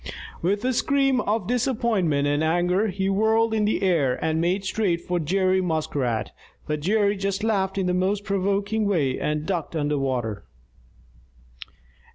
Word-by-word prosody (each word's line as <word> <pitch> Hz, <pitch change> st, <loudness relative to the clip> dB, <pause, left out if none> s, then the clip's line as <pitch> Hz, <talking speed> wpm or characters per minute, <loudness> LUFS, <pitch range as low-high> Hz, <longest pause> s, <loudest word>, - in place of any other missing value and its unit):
With 200 Hz, +6 st, 0 dB
a 255 Hz, -, +1 dB
scream 270 Hz, 0 st, +2 dB
of 210 Hz, -1 st, -1 dB
disappointment 220 Hz, -, +1 dB
and 145 Hz, +2 st, +1 dB
anger, 175 Hz, +6 st, +1 dB
he 190 Hz, -1 st, -2 dB
whirled 220 Hz, +3 st, +2 dB
in 215 Hz, -1 st, +1 dB
the 210 Hz, -, 0 dB
air 155 Hz, -9 st, +2 dB
and 160 Hz, 0 st, 0 dB
made 185 Hz, +3 st, 0 dB
straight 190 Hz, -4 st, 0 dB
for 175 Hz, +1 st, -2 dB
Jerry 185 Hz, +3 st, +1 dB
Muskrat. 145 Hz, -, -1 dB, 0.3 s
But 150 Hz, 0 st, -2 dB
Jerry 200 Hz, +5 st, +2 dB
just 195 Hz, +1 st, -2 dB
laughed 195 Hz, -3 st, 0 dB
in 190 Hz, -, 0 dB
the 180 Hz, -, +1 dB
most 195 Hz, +3 st, 0 dB
provoking 200 Hz, +2 st, 0 dB
way 145 Hz, -10 st, 0 dB
and 150 Hz, 0 st, -2 dB
ducked 170 Hz, -3 st, -3 dB
under 145 Hz, -2 st, 0 dB
water. 120 Hz, -7 st, -2 dB
190 Hz, 155 wpm, -24 LUFS, 160-210 Hz, 0.3 s, scream